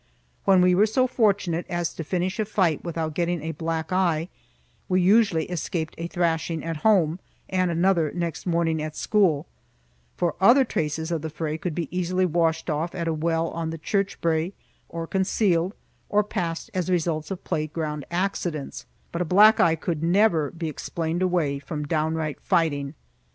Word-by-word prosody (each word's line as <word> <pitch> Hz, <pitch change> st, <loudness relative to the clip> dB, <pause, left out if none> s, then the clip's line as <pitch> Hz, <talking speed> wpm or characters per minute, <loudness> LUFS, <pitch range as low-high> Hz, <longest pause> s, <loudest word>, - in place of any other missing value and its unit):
When 190 Hz, -2 st, +5 dB
we 180 Hz, 0 st, +5 dB
were 205 Hz, +4 st, +4 dB
so 255 Hz, +4 st, +2 dB
fortunate 200 Hz, -8 st, +1 dB
as 175 Hz, -1 st, -2 dB
to 165 Hz, -, -5 dB
finish 185 Hz, +4 st, -2 dB
a 215 Hz, -, +1 dB
fight 185 Hz, -7 st, +1 dB
without 165 Hz, -2 st, -3 dB
getting 170 Hz, -1 st, -1 dB
a 160 Hz, -, -2 dB
black 160 Hz, +1 st, -3 dB
eye, 175 Hz, -3 st, +1 dB, 0.6 s
we 185 Hz, -, +3 dB
usually 185 Hz, -3 st, +4 dB
escaped 165 Hz, -2 st, -3 dB
a 165 Hz, -, -3 dB
thrashing 165 Hz, -2 st, -1 dB
at 165 Hz, -1 st, -3 dB
home 175 Hz, -3 st, +3 dB, 0.3 s
and 185 Hz, -1 st, +1 dB
another 170 Hz, -2 st, +2 dB
next 170 Hz, 0 st, -4 dB
morning 165 Hz, -2 st, +1 dB
at 155 Hz, 0 st, -5 dB
school, 180 Hz, -8 st, +2 dB, 0.7 s
for 170 Hz, -3 st, +1 dB
other 255 Hz, +7 st, +6 dB
traces 160 Hz, -4 st, -2 dB
of 165 Hz, -3 st, -1 dB
the 160 Hz, -, -4 dB
fray 155 Hz, 0 st, -3 dB
could 160 Hz, 0 st, -4 dB
be 170 Hz, -, -2 dB
easily 185 Hz, +1 st, +1 dB
washed 165 Hz, -1 st, +1 dB
off 160 Hz, +2 st, -2 dB
at 170 Hz, -1 st, -2 dB
a 165 Hz, -, +1 dB
well 165 Hz, +1 st, 0 dB
on 165 Hz, -1 st, -3 dB
the 165 Hz, -, -5 dB
church 195 Hz, +5 st, -1 dB
brae, 165 Hz, +2 st, 0 dB, 0.4 s
or 165 Hz, 0 st, -4 dB
concealed, 190 Hz, 0 st, +1 dB, 0.3 s
or 210 Hz, +1 st, +3 dB
passed 170 Hz, 0 st, -4 dB
as 185 Hz, -1 st, -1 dB
results 165 Hz, -3 st, 0 dB
of 190 Hz, -2 st, -5 dB
playground 155 Hz, -1 st, -3 dB
accidents; 175 Hz, -5 st, -3 dB, 0.2 s
but 170 Hz, -, -3 dB
a -, -, +3 dB
black 210 Hz, +6 st, +6 dB
eye 165 Hz, -2 st, +4 dB
could 160 Hz, -1 st, -3 dB
never 170 Hz, -3 st, +3 dB
be 165 Hz, -1 st, -5 dB
explained 165 Hz, +2 st, -3 dB
away 170 Hz, -7 st, +1 dB
from 150 Hz, +1 st, -5 dB
downright 155 Hz, -1 st, -1 dB
fighting. 155 Hz, -5 st, 0 dB
170 Hz, 170 wpm, -25 LUFS, 160-185 Hz, 0.7 s, other